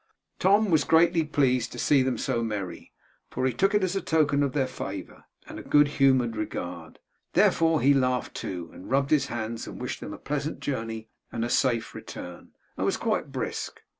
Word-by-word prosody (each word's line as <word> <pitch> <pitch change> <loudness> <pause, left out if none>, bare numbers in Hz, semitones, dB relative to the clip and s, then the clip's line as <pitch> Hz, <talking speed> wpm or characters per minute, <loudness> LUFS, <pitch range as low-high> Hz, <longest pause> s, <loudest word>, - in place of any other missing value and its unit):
Tom 205 +1 +4
was 155 -3 +4
greatly 165 0 +4
pleased 130 -5 +1
to - - -8
see 145 -2 +3
them 130 -1 0
so 120 -3 -1
merry, 105 -5 -5 0.4
for 130 - -2
he 130 - +1
took 195 - +2
it 205 - +3
as 185 0 0
a 195 - 0
token 150 -3 +2
of 140 -2 0
their 140 -3 +1
favour, 95 -7 -7 0.2
and - - -9
good 145 0 +6
humoured 130 -5 +2
regard. 90 -6 -5 0.4
Therefore 165 -1 +4
he 140 +2 +5
laughed 130 -2 0
too 85 -3 -5
and - - -11
rubbed 135 +2 +1
his 140 -3 +3
hands 115 0 -4
and - - -8
wished - - -4
them - - -7
a - - -7
pleasant 150 +2 -3
journey 115 -4 -4 0.2
and 115 +1 -2
safe 120 -4 +1
return, 90 -1 -9 0.3
and - - -1
was - - +1
quite - - -1
brisk. - - -4
130 Hz, 190 wpm, -27 LUFS, 115-150 Hz, 0.4 s, good